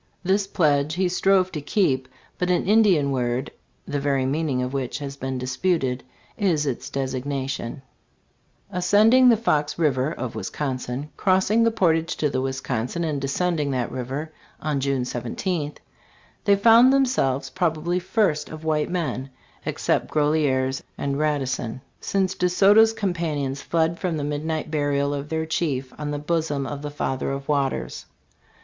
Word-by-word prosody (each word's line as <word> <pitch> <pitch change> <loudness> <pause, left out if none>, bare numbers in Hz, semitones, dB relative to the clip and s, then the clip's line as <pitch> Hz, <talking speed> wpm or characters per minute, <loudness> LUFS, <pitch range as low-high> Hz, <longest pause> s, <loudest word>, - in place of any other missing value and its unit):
This 195 +2 +1
pledge 150 -4 +2
he 185 0 +1
strove 185 +1 +2
to 150 - -4
keep; 135 -5 +1 0.3
but 180 - 0
an 180 0 +1
I 205 - +4
Lilian 185 -11 +4
word, 125 -1 -1 0.3
the 145 - -2
very 140 -2 +1
meaning 140 -2 0
of 125 +1 -4
which 135 -3 -2
has 140 -1 -6
been 130 -1 -4
disputed, 130 0 -1 0.3
is 170 -8 +1
its 135 -4 -3
desig 130 -2 -3
nation, 135 -1 -4 0.4
"* - - -41
Ascending 210 +8 +5
the 230 - +5
Fox 150 -9 0
river 145 -3 +1
[of 125 -7 -5
Wisconsin], 135 0 -4
crossing 195 +3 +3
the 230 - +5
portage 165 -7 +1
to 150 -2 0
the 130 - 0
Wisconsin 135 +3 -2
and 150 -4 -2
descending 150 +2 0
that 125 -3 -1
river, 135 +5 -4 0.3
on 150 -2 -1
June 135 -1 0
i7th, 145 +6 -3 0.7
they 200 - +5
found 230 +5 +7
them 275 0 +4
selves, 135 - 0
probably 175 0 0
first 185 -4 0
of 155 0 -9
white 155 -1 +1
men 135 -7 -2 0.4
[except - - 0
Groseilliers 145 -3 +1 0.2
and 140 0 -2
Radisson 130 -6 -1
?] - - -41
since 190 -1 +1
DeSoto's 200 +5 +5
companions 160 -9 -2
fled 165 0 0
from 175 -4 -1
the 145 - -3
midnight 155 +2 -3
burial 145 -2 +1
of 145 +1 -4
their 160 0 -1
chief, 140 -5 -2
on 150 -1 -3
the 145 - -2
bosom 150 -2 -1
of 145 +1 -5
the 145 - -4
Father 135 -3 -2
of 135 0 -5
Waters. 140 -3 -1
150 Hz, 160 wpm, -24 LUFS, 135-180 Hz, 0.7 s, found